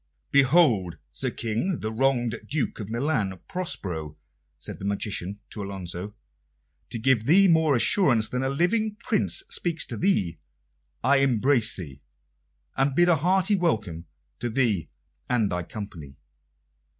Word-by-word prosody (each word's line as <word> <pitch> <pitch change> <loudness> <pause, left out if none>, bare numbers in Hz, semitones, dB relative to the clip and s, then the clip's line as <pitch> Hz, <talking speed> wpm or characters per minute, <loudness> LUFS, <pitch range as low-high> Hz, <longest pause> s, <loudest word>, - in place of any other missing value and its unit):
"Behold, 130 - +4 0.2
Sir - - -2
King, 115 - -2
the 110 - -3
wronged 120 -2 +1
Duke 145 -4 -1
of 105 -2 -6
Milan, 115 - -1
Prospero," 90 - -5 0.4
said - - -7
the 95 - -6
magician 100 -1 -3
to 105 - -6
Alonso. 95 0 -5 0.7
"To - - -4
give 115 -1 +2
thee 195 +8 +6
more 160 -4 +4
assurance 120 - +3
that 125 - -2
a 135 - 0
living 205 +9 +1
Prince 235 - +1
speaks 170 -2 0
to - - -6
thee, 135 - 0 0.6
I 140 +3 +4
embrace 130 -2 +3
thee, 70 -7 -9 0.7
and 135 0 +1
bid 175 +2 +4
a 170 - +5
hearty 190 +6 +2
welcome 105 - -1 0.3
to 120 - -2
thee 110 - 0 0.4
and 115 -5 +1
thy 90 0 -1
company." 85 -7 -8
120 Hz, 140 wpm, -25 LUFS, 100-155 Hz, 0.7 s, thee